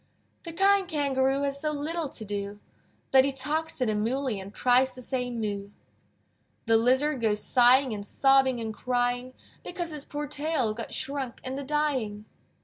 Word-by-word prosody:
The 335 - -5
kind 390 +2 +3
Kangaroo 275 -3 +1
Has 280 0 -2
so 305 - 0
little 305 +1 -3
to 220 - -5
do, 205 0 -5 0.5
That 265 -1 +7
he 275 - +1
talks 300 +4 -2
to 255 - +1
the 215 - 0
Moolly 230 +1 -1
And 190 +1 -8
tries 255 +3 +2
to 255 - -10
say 250 -1 -2
"Moo!" 205 -4 -4 1.0
The 225 -1 +3
Lizard 260 +4 +2
goes 210 -2 +1
sighing, 255 +1 +4
And 205 -1 -5
sobbing 265 +3 +3
and 220 -1 -4
crying, 245 +2 -1 0.3
Because 345 -2 -5
his 300 -2 -6
poor 295 0 -4
tail 295 -5 -1
Got 230 +1 -7
shrunk 265 -2 -3
in 260 - -4
the 280 +1 -4
dyeing. 265 -8 -1
260 Hz, 170 wpm, -27 LUFS, 230-290 Hz, 1.0 s, That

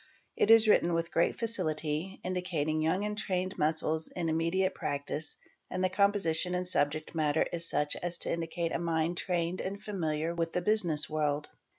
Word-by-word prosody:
It - - +1
is 225 0 +8
written 175 -5 +4
with 165 0 -2
great 170 - +1
facility, 165 -5 -2
indica 180 -1 -3
in 155 +1 0
young 185 +6 +1
and 210 0 -3
trained 185 -3 -2
muscles 160 +1 +3
in 170 -2 -1
immediate 170 +4 +1
practice, 145 +2 -4 0.3
and 185 - -2
the 185 - +1
compositi 185 -3 +2
and 180 0 -2
subject 155 -2 0
matter 155 -1 +1
is 170 -1 +1
such 150 0 0
as 175 -1 0
to - - 0
indicate 165 0 -2
a - - -1
mind 165 0 -1
trained 175 -1 -1
and 195 +1 -4
famili 165 -6 -2
with 165 -1 -2
the 180 - 0
business 175 -8 +2
world. 150 -1 -1
170 Hz, 180 wpm, -30 LUFS, 155-185 Hz, 0.3 s, is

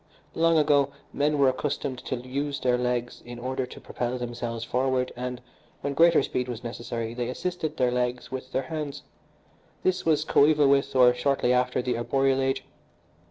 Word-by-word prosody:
Long 165 0 +3
ago 145 -2 +4 0.2
men 150 +1 +1
were 140 -1 +5
accustomed 130 -1 -1
to - - -2
use 135 +3 -3
their 125 -1 +2
legs 125 -1 -2
in 120 0 -9
order 130 +1 -3
to - - -11
propel 125 +1 -3
themselves 120 -1 -4
forward, 130 +1 0
and, 125 0 -5 0.4
when 140 - -2
greater 165 0 +5
speed 125 -1 -2
was 120 -1 -6
necessary, 115 -1 -4
they 120 0 -3
assisted 160 +2 -3
their 125 -1 +2
legs 125 0 -2
with 130 0 -6
their 135 - 0
hands 150 0 -5 0.8
this 185 0 +1
was 160 -2 +2
coeval 150 0 +5
with, 140 0 +2
or 125 -1 +7
shortly 125 0 +1
after, 125 0 +1
the 120 -2 -1
arboreal 135 +2 +1
age. 135 0 0
130 Hz, 170 wpm, -26 LUFS, 125-140 Hz, 0.8 s, or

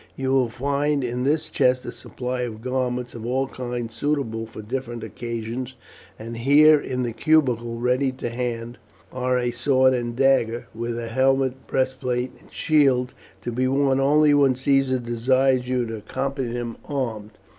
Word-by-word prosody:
You 130 0 -2
will 130 -3 +3
find 140 +3 0
in 125 +1 -2
this 155 +2 +1
chest 130 -3 +1
a - - -4
supply 125 0 -5
of 115 -2 -5
garments 125 -1 -2
of 115 - -8
all 130 +3 0
kinds 120 -3 -5
suitable 115 -4 -2
for 110 -1 -10
different 120 0 -4
occasions, 115 +3 -5 0.4
and 115 +1 -7
here, 150 +5 +6
in 130 -2 -3
the 120 -2 -3
cubicule, 120 -4 +2
ready 125 +2 +1
to 125 -2 -5
hand, 120 -1 -4 0.3
are 125 0 0
a 120 -1 0
sword 130 +1 +3
and 120 -1 -2
dagger, 130 -3 +2
with 115 +1 -4
a 115 -1 -4
helmet, 130 +1 +1
breastplate, 130 -1 -1
and - - -21
shield, 135 -5 +2 0.3
to 120 - -3
be 130 +2 0
worn 135 0 +2
only 145 +2 +4
when 140 -3 +4
Caesar 135 0 +2
desires 125 +2 +1
you 125 -1 +1
to 115 -1 -5
accompany 135 +3 -3
him 120 -2 -4
armed. 115 -7 -3
125 Hz, 165 wpm, -23 LUFS, 120-135 Hz, 0.4 s, here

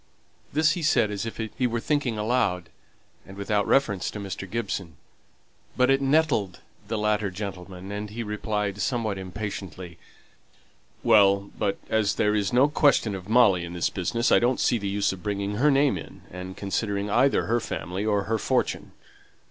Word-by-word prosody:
This 155 +2 +3
he 175 - -2
said 110 -8 +2
as 105 +2 -3
if 115 - -7
he 115 +3 -2
were 115 0 -2
thinking 135 -3 -1
aloud, 105 -6 0 0.5
and 95 - -12
without 100 0 0
reference 110 -9 +2
to 105 - -7
Mr. 95 -1 -6
Gibson, 95 -8 -4 0.8
but 125 +1 +4
it 135 0 +3
nettled 135 - +1 0.3
the 110 +1 -2
latter, 105 -1 +1
and 95 +1 -6
he 115 +3 -5
replied 105 -1 -2
somewhat 110 -6 -1
impatiently, 95 -3 -6 1.0
"Well, 100 -1 +4
but 100 -2 -1
as 110 -2 +1
there's 105 -2 +1
no 125 +3 +5
question 145 -7 +3
of 95 0 -7
Molly 110 -7 +5
in 85 0 -7
this 90 - -1
business, 115 +6 0
I - - +7
don't 125 +2 +1
see 120 - +2
the 100 - -3
use 100 0 0
of 95 - -10
bringing 100 0 -2
her 145 +6 +4
name 140 -1 +3
in, - - -12
and 90 +1 -8
considering 100 0 -2
either 135 +5 +3
her 120 +2 +1
family 95 -3 -4
or 105 -2 +1
her 110 +2 -1
fortune." - - -1
105 Hz, 165 wpm, -26 LUFS, 95-115 Hz, 1.0 s, I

